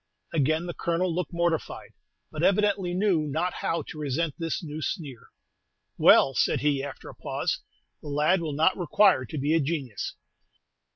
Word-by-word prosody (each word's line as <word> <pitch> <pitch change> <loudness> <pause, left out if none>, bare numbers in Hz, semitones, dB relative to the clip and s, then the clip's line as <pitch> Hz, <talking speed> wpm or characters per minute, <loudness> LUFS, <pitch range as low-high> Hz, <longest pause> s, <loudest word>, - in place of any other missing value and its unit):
Again 155 +2 +1
the 175 - -4
Colonel 170 +1 -1
looked 180 +2 -3
mortified, 170 -2 -2 0.4
but 155 - -5
evidently 195 -1 +2
knew 185 -6 +2
not 160 +5 -1
how 165 - -2
to 155 - -9
resent 150 +2 -1
this 165 +2 -2
new 155 0 -6
sneer. 140 -6 -5 0.7
"Well," 135 - +6
said - - +1
he, 145 -2 +1
after 140 - -8
a - - -9
pause, - - -2 0.4
"the - - -10
lad 150 +5 +2
will 155 -3 -3
not 160 +6 +3
require 180 -4 +3
to 155 - -7
be 145 +3 +1
a 165 - +4
genius." 140 -7 -3
160 Hz, 165 wpm, -27 LUFS, 145-175 Hz, 0.7 s, Well